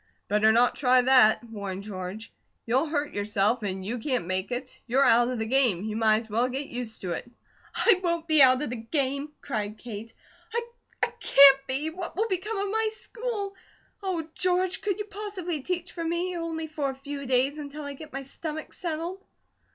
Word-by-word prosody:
"Better 210 Hz, +2 st, +4 dB
not 240 Hz, +2 st, +4 dB
try 255 Hz, -2 st, +4 dB
that!" 250 Hz, -4 st, +6 dB
warned 200 Hz, -4 st, -6 dB
George. 200 Hz, +2 st, -7 dB, 0.3 s
"You'll 260 Hz, +7 st, +2 dB
hurt 295 Hz, -1 st, -2 dB
yourself, 210 Hz, +3 st, +1 dB
and 190 Hz, -2 st, -4 dB
you 235 Hz, +4 st, -3 dB
can't 250 Hz, -, -1 dB
make 185 Hz, +4 st, -2 dB
it. 250 Hz, +1 st, -5 dB
You're 265 Hz, +4 st, +3 dB
out 240 Hz, +1 st, +5 dB
of 250 Hz, 0 st, -2 dB
the 220 Hz, -, -2 dB
game; 235 Hz, -7 st, +3 dB
you 215 Hz, 0 st, -3 dB
might 220 Hz, 0 st, +3 dB
as -, -, -16 dB
well 235 Hz, +4 st, +2 dB
get 270 Hz, +3 st, -2 dB
used 240 Hz, -4 st, -6 dB
to 180 Hz, -, -3 dB
it." 240 Hz, +7 st, -5 dB, 0.4 s
"I 390 Hz, -6 st, +4 dB
won't 340 Hz, -2 st, -1 dB
be 310 Hz, -3 st, +6 dB
out 260 Hz, +1 st, +6 dB
of 295 Hz, -, -3 dB
the 250 Hz, -, -3 dB
game!" 275 Hz, +4 st, -2 dB
cried 215 Hz, -5 st, -3 dB
Kate. 225 Hz, -1 st, -8 dB, 0.9 s
"I -, -, +2 dB
can't 275 Hz, -1 st, +7 dB
be! 280 Hz, +4 st, -2 dB
What 350 Hz, 0 st, -7 dB
will 440 Hz, +3 st, +1 dB
become 405 Hz, +2 st, -2 dB
of 400 Hz, 0 st, -1 dB
my 445 Hz, 0 st, +1 dB
school? 440 Hz, -3 st, -5 dB, 0.5 s
Oh, 360 Hz, -5 st, -2 dB
George, 365 Hz, 0 st, +1 dB
could 400 Hz, -2 st, -1 dB
you 420 Hz, -, -4 dB
possibly 400 Hz, -6 st, -5 dB
teach 355 Hz, +3 st, -3 dB
for 335 Hz, -, -5 dB
me, 345 Hz, +2 st, -1 dB
only 330 Hz, -1 st, -3 dB
for 300 Hz, -3 st, -2 dB
a 265 Hz, -, -5 dB
few 280 Hz, 0 st, -7 dB
days, 265 Hz, +4 st, +2 dB
until 295 Hz, +1 st, -7 dB
I 285 Hz, 0 st, -5 dB
get 300 Hz, +2 st, -11 dB
my 275 Hz, 0 st, -5 dB
stomach 310 Hz, +3 st, -7 dB
settled?" 345 Hz, +3 st, -4 dB
275 Hz, 195 wpm, -27 LUFS, 230-335 Hz, 0.9 s, can't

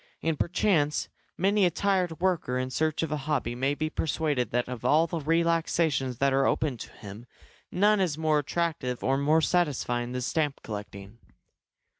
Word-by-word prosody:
And 160 Hz, -3 st, -1 dB
perchance 165 Hz, -5 st, +1 dB, 0.3 s
many 200 Hz, +3 st, +2 dB
a 180 Hz, -, +5 dB
tired 180 Hz, -2 st, 0 dB
worker 175 Hz, -9 st, 0 dB
in 130 Hz, 0 st, -2 dB
search 155 Hz, +3 st, 0 dB
of 160 Hz, -, -3 dB
a 150 Hz, -, 0 dB
hobby 130 Hz, -5 st, 0 dB
may 135 Hz, +4 st, 0 dB
be 155 Hz, +1 st, -2 dB
persuaded 155 Hz, -4 st, -1 dB
that 120 Hz, +1 st, -1 dB
of 125 Hz, -3 st, -6 dB
all 155 Hz, +3 st, +4 dB
the 170 Hz, 0 st, -3 dB
relaxations 165 Hz, -4 st, +1 dB
that 140 Hz, +1 st, +2 dB
are 135 Hz, 0 st, +3 dB
open 145 Hz, -5 st, 0 dB
to -, -, -9 dB
him 105 Hz, +3 st, -11 dB, 0.4 s
none 205 Hz, +3 st, +3 dB
is 175 Hz, -6 st, 0 dB
more 155 Hz, -1 st, +2 dB
attractive 150 Hz, -5 st, -2 dB
or 135 Hz, -, +2 dB
more 155 Hz, +3 st, +3 dB
satisfying 130 Hz, -8 st, 0 dB
than 125 Hz, -, -2 dB
stamp 145 Hz, +3 st, -1 dB
collecting. 105 Hz, 0 st, -8 dB
150 Hz, 170 wpm, -27 LUFS, 125-165 Hz, 0.4 s, a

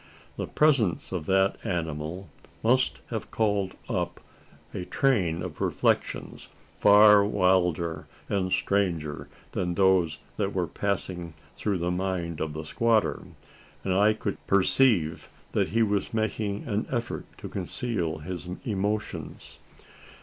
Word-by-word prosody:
The -, -, -4 dB
presence 135 Hz, -, +2 dB
of 90 Hz, -5 st, -4 dB
that 95 Hz, +1 st, +2 dB
animal 80 Hz, +1 st, -3 dB, 0.4 s
must 125 Hz, +3 st, +2 dB
have 110 Hz, -3 st, -4 dB
called 100 Hz, -4 st, 0 dB
up -, -, -2 dB, 0.5 s
a 90 Hz, -, -4 dB
train 90 Hz, -, +1 dB
of 90 Hz, -5 st, -7 dB
reflections, -, -, -1 dB, 0.3 s
far 105 Hz, 0 st, +8 dB
wilder 90 Hz, -5 st, +1 dB, 0.2 s
and 95 Hz, -2 st, -1 dB
stranger 85 Hz, -9 st, 0 dB, 0.2 s
than 90 Hz, -1 st, -2 dB
those 90 Hz, -4 st, +3 dB, 0.2 s
that 100 Hz, -2 st, -1 dB
were 90 Hz, -2 st, +1 dB
passing 90 Hz, -3 st, -2 dB, 0.2 s
through 100 Hz, -3 st, -1 dB
the 85 Hz, +1 st, -1 dB
mind 90 Hz, -3 st, -2 dB
of 80 Hz, -1 st, -2 dB
the 75 Hz, +1 st, -6 dB
squatter; 110 Hz, +2 st, +1 dB, 0.6 s
and 95 Hz, -, 0 dB
I 105 Hz, +3 st, +4 dB
could 105 Hz, -2 st, -4 dB
perceive 100 Hz, -4 st, +3 dB, 0.2 s
that -, -, +1 dB
he 115 Hz, +2 st, +2 dB
was 105 Hz, 0 st, -1 dB
making 110 Hz, -2 st, -1 dB
an 105 Hz, -1 st, -1 dB
effort 120 Hz, -2 st, -3 dB
to -, -, -7 dB
conceal 90 Hz, -11 st, -2 dB
his 90 Hz, +3 st, -6 dB, 0.2 s
emotions. 105 Hz, 0 st, -3 dB
95 Hz, 125 wpm, -27 LUFS, 85-105 Hz, 0.6 s, far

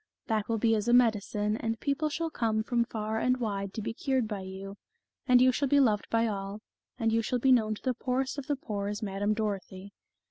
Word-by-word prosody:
That 220 Hz, -2 st, -1 dB
will 225 Hz, -, +1 dB
be 225 Hz, +1 st, +2 dB
as 215 Hz, 0 st, 0 dB
a 240 Hz, -, +3 dB
medi 230 Hz, -4 st, +5 dB
cine, 210 Hz, +2 st, -2 dB
and 225 Hz, -1 st, -2 dB
people 285 Hz, +5 st, 0 dB
shall 325 Hz, +2 st, -3 dB
come 220 Hz, -4 st, 0 dB
from 235 Hz, 0 st, +1 dB
far 220 Hz, -1 st, -3 dB
and 255 Hz, +2 st, +2 dB
wide 200 Hz, -5 st, -3 dB
to 220 Hz, -, -4 dB
be 225 Hz, +1 st, -3 dB
cured 260 Hz, -1 st, 0 dB
by 210 Hz, -2 st, -4 dB
you, 190 Hz, +1 st, -8 dB, 0.5 s
and 250 Hz, -1 st, +6 dB
you 255 Hz, +1 st, +6 dB
shall 280 Hz, +3 st, 0 dB
be 285 Hz, +2 st, +4 dB
loved 215 Hz, -7 st, +2 dB
by 230 Hz, 0 st, +2 dB
all, 200 Hz, -1 st, -4 dB, 0.4 s
and 225 Hz, -2 st, +1 dB
you 230 Hz, -, +3 dB
shall 250 Hz, +3 st, -1 dB
be 260 Hz, +2 st, +3 dB
known 220 Hz, -4 st, +3 dB
to -, -, -14 dB
the 255 Hz, -, +1 dB
poorest 260 Hz, +3 st, -2 dB
of 265 Hz, -, -8 dB
the 290 Hz, -, +1 dB
poor 205 Hz, -6 st, -4 dB
as 205 Hz, +2 st, -4 dB
Madame 205 Hz, +1 st, -1 dB
Dorothy." 200 Hz, -2 st, -4 dB
225 Hz, 240 wpm, -29 LUFS, 205-250 Hz, 0.5 s, and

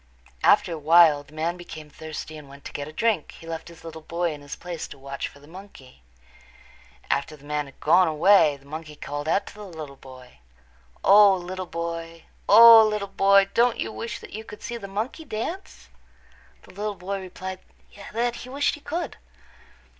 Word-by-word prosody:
After 175 Hz, -, +4 dB
a 160 Hz, -, -5 dB
while 160 Hz, -1 st, +6 dB
the 145 Hz, +2 st, -18 dB
man 165 Hz, +3 st, -2 dB
became 155 Hz, -4 st, -10 dB
thirsty 155 Hz, 0 st, -8 dB
and 150 Hz, -2 st, -11 dB
went 140 Hz, +1 st, -15 dB
to -, -, -7 dB
get 145 Hz, 0 st, -5 dB
a -, -, -9 dB
drink. 210 Hz, -1 st, 0 dB
He -, -, -14 dB
left 165 Hz, -1 st, -6 dB
his 170 Hz, -1 st, -14 dB
little 160 Hz, -1 st, -9 dB
boy 170 Hz, +1 st, -2 dB
in 145 Hz, -, -10 dB
his 145 Hz, -1 st, -8 dB
place 175 Hz, -2 st, -6 dB
to -, -, -12 dB
watch 140 Hz, 0 st, -5 dB
for 140 Hz, -, -16 dB
the 145 Hz, -, -17 dB
monkey. 165 Hz, -, -14 dB, 1.1 s
After 145 Hz, +2 st, -1 dB
the 145 Hz, -1 st, -18 dB
man 150 Hz, -1 st, -2 dB
had 135 Hz, -, -17 dB
gone 175 Hz, +4 st, +4 dB
away 160 Hz, -1 st, +4 dB
the 140 Hz, -, -23 dB
monkey 155 Hz, +1 st, -8 dB
called 145 Hz, +1 st, -6 dB
out 180 Hz, +5 st, +1 dB
to -, -, -11 dB
the 210 Hz, -, -10 dB
little 160 Hz, -7 st, -9 dB
boy, 130 Hz, -, -15 dB, 0.6 s
"O, 200 Hz, -1 st, +7 dB
little 185 Hz, 0 st, -6 dB
boy, 165 Hz, 0 st, -5 dB, 0.3 s
O, 230 Hz, +1 st, +10 dB
little 210 Hz, -2 st, -1 dB
boy, 195 Hz, 0 st, +4 dB
don't 240 Hz, 0 st, +3 dB
you -, -, -2 dB
wish 230 Hz, +1 st, -5 dB
that -, -, -12 dB
you 220 Hz, +2 st, -6 dB
could 210 Hz, -1 st, -12 dB
see 240 Hz, -, -5 dB
the 200 Hz, -4 st, -8 dB
monkey 220 Hz, +11 st, -4 dB
dance?" 310 Hz, -, -6 dB, 0.7 s
The -, -, -16 dB
little 205 Hz, +1 st, -4 dB
boy 195 Hz, +1 st, -5 dB
replied 185 Hz, 0 st, -7 dB, 0.5 s
that 240 Hz, +2 st, -1 dB
he 250 Hz, -, -9 dB
wished 280 Hz, +2 st, 0 dB
he 295 Hz, -, -9 dB
could. 320 Hz, 0 st, -4 dB
170 Hz, 195 wpm, -25 LUFS, 150-205 Hz, 1.1 s, O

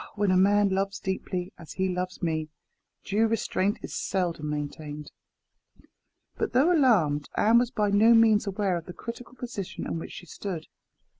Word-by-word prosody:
Ah! -, -, -15 dB
when 205 Hz, -2 st, +2 dB
a -, -, +4 dB
man 200 Hz, +2 st, +4 dB
loves 195 Hz, +1 st, -1 dB
deeply, 185 Hz, -1 st, -3 dB
as 160 Hz, -3 st, -10 dB
he 190 Hz, 0 st, 0 dB
loves 180 Hz, 0 st, -3 dB
me, 155 Hz, -2 st, -1 dB, 0.5 s
due 215 Hz, +3 st, +2 dB
restraint 205 Hz, -3 st, 0 dB
is -, -, -6 dB
seldom 170 Hz, -5 st, -2 dB
maintained." 150 Hz, 0 st, -5 dB, 1.3 s
But 440 Hz, -, -2 dB
though 290 Hz, +8 st, +4 dB
alarmed, 180 Hz, -, +3 dB
Anne 225 Hz, +3 st, +5 dB
was 245 Hz, -1 st, +1 dB
by 210 Hz, -4 st, 0 dB
no 220 Hz, +3 st, +6 dB
means 220 Hz, -2 st, +5 dB
aware 195 Hz, -2 st, 0 dB
of 165 Hz, -, -8 dB
the 180 Hz, -, -7 dB
critical 240 Hz, +4 st, -8 dB
position 205 Hz, -7 st, -6 dB
in 165 Hz, -, -3 dB
which -, -, -8 dB
she -, -, -9 dB
stood. 175 Hz, -1 st, -6 dB
195 Hz, 170 wpm, -27 LUFS, 175-220 Hz, 1.3 s, no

